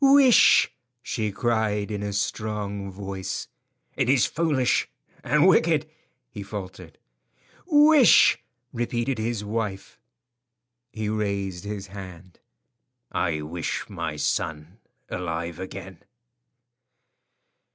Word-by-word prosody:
"Wish!" 275 -3 +6 0.3
she 110 -3 -2
cried, 110 -1 0
in 105 -1 -3
a 105 0 -3
strong 100 0 -3
voice. 95 -1 -5 0.5
"It - - 0
is 130 -3 +4
foolish 150 -6 +1 0.3
and 150 +2 +3
wicked," 160 -4 +3 0.4
he 105 - -7
faltered. 95 -4 -8 0.7
"Wish!" 295 - +6 0.3
repeated 120 +1 -2
his 110 -1 -2
wife. 105 -3 -4 0.9
He 110 -1 -4
raised 100 -3 -2
his 100 -1 -5
hand. 95 -3 -11 0.7
"I 80 -3 -1
wish 80 +2 -4
my 85 -5 -4
son 80 +5 -3 0.3
alive 85 -2 -4
again." 95 -1 -8
105 Hz, 95 wpm, -25 LUFS, 95-120 Hz, 0.9 s, Wish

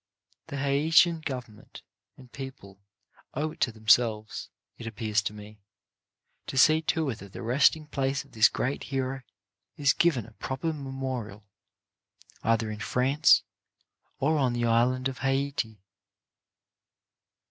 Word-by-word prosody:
The 140 - -5
Haitian 160 +4 +3
Government 120 -6 -7 0.3
and 125 -2 -16
people 130 -8 -9 0.6
owe 155 +3 -1
it - - -15
to 120 - +2
them 110 -1 -17
selves, 110 -1 +3 0.3
it 115 - -7
appears 110 -2 -1
to 100 - -3
me, 105 0 -12 0.9
to 135 - -5
see 155 +4 +6
to 160 -1 0
it 110 - -7
that 100 -1 -12
the - - -7
rest 130 +7 +4
ing 155 -1 -11
place 135 -2 -1
of - - -23
this 110 -1 +5
great 130 +3 -2
hero 135 0 -3 0.6
is 140 -1 +3
given 150 -11 +2
a - - -14
proper 130 +9 -3
memorial, 130 -7 -5 1.0
either 115 -1 +1
in 105 - -6
France 135 +6 +3 0.7
or 155 +3 +1
on 130 -3 +2
the 120 0 0
island 125 +3 +2
of 135 - -6
Haiti. 135 -4 -1
130 Hz, 140 wpm, -28 LUFS, 110-140 Hz, 1.0 s, see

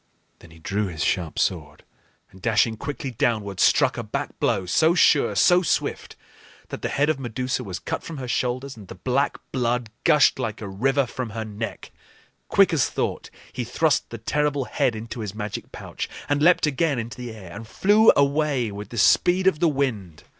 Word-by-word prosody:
Then 85 - -16
he 80 - -16
drew 100 +5 -2
his 80 -4 -4
sharp 85 -4 -1
sword 75 -5 -2 0.5
and, 95 - -17
dashing 115 0 +2
quickly 135 +3 -5
downward, 105 -5 -1
struck - - +3
a - - -3
back - - -5
blow, 95 - +1
so 160 - +3
sure, - - +4
so 180 0 +5
swift, 175 - -2 0.5
that - - -6
the - - -2
head 145 +1 +1
of 155 -3 0
Medusa 125 +1 -3
was 95 -5 -5
cut - - -4
from 165 - -8
her 130 -2 -6
shoulders 130 +2 -2
and 105 -4 -13
the - - -9
black 130 +9 0
blood 120 -2 -1
gushed 150 -4 +4
like 115 -4 -3
a 110 - -6
river 135 +8 +1
from 125 0 -5
her 110 0 -5
neck. 110 +2 -6 0.6
Quick - - +4
as - - +2
thought - - -3 0.2
he 125 - -3
thrust 140 +4 0
the 115 - -7
terrible 145 +4 -1
head 130 -4 0
into 115 +2 -7
his 105 -2 -5
magic 105 -1 -6
pouch - - -6 0.2
and 145 0 0
leaped 175 +2 +5
again 150 0 0
into 120 +2 -5
the 125 -1 -6
air, 100 -5 -11
and 115 +1 -8
flew 210 - +5
away 140 -4 +1
with 100 +1 -8
the 120 - -8
speed 180 - +4
of 190 -6 +3
the 170 -1 +3
wind. 115 - -3
120 Hz, 195 wpm, -24 LUFS, 105-145 Hz, 0.6 s, so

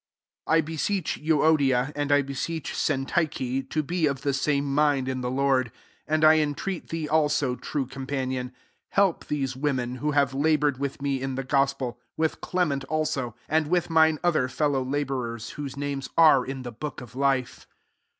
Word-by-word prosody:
£ - - -2
I 160 0 +5
BESEECH 165 +4 -2
Euodia, 145 -4 +3
and 145 0 -1
I 145 0 +5
beseech 145 +3 -4
Syntych^, 135 -2 -1
to 155 - 0
be 165 +1 0
of 140 -2 -3
the 140 - +1
same 140 +1 +1
mind 140 -1 +2
in 130 -1 -2
the 125 - -2
I^ord: 135 0 +2
3 - - -19 0.4
and 155 +1 +1
1 155 0 +8
entreat 155 +5 -2
thee 165 -2 -3
also, 150 -4 +2
true 140 +1 -3
com 135 +1 -8
panion, 130 -2 -2 0.4
help 195 -4 +2
those 135 -3 -2
women, 130 -3 -1
who 150 +4 -1
have 140 -2 +2
laboured 145 -1 +2
with 140 0 -4
me 135 -2 0
in 135 -1 -3
the 135 - -3
gospel, 135 -2 0 0.2
with 160 0 0
Clement 155 -7 0
also, 135 -6 -2
and 155 0 +1
with 175 +1 0
mine 160 -1 +5
other 165 -7 +2
fellow 140 0 0
labour 130 -3 -2
ers, 115 0 -8
whose 140 -2 -6
names 140 -1 -3
are 155 -6 +7
in 135 -1 -5
the 120 - -6
book 145 +6 -6
of 125 -1 -12
life. 135 -2 0
140 Hz, 180 wpm, -26 LUFS, 130-155 Hz, 0.4 s, 1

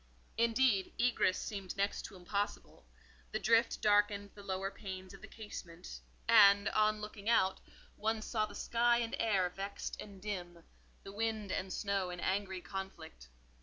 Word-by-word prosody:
Indeed, 230 -3 +3
egress 240 -6 +2
seemed 195 -2 -5
next 200 +1 0
to - - -9
impossible; 200 +3 -4 0.4
the 215 - 0
drift 230 +1 +3
darkened 205 -1 +3
the 205 - -11
lower 195 0 -3
panes 190 -2 -7
of 195 - -12
the - - -9
casement, 180 -5 -9 0.3
and, 200 -3 +7
on 215 0 +2
looking 210 0 -5
out, 190 -5 +3 0.4
one 220 0 -1
saw 215 -2 0
the - - -11
sky 235 0 +2
and 230 -1 -1
air 200 -5 +2
vexed 195 +2 -5
and 200 -2 -10
dim, 175 -4 -5 0.4
the 195 - -8
wind 215 -1 -2
and 185 0 -2
snow 200 -3 -1
in 180 -1 -6
angry 190 -1 -1
conflict. 170 - -7
200 Hz, 155 wpm, -34 LUFS, 190-215 Hz, 0.4 s, and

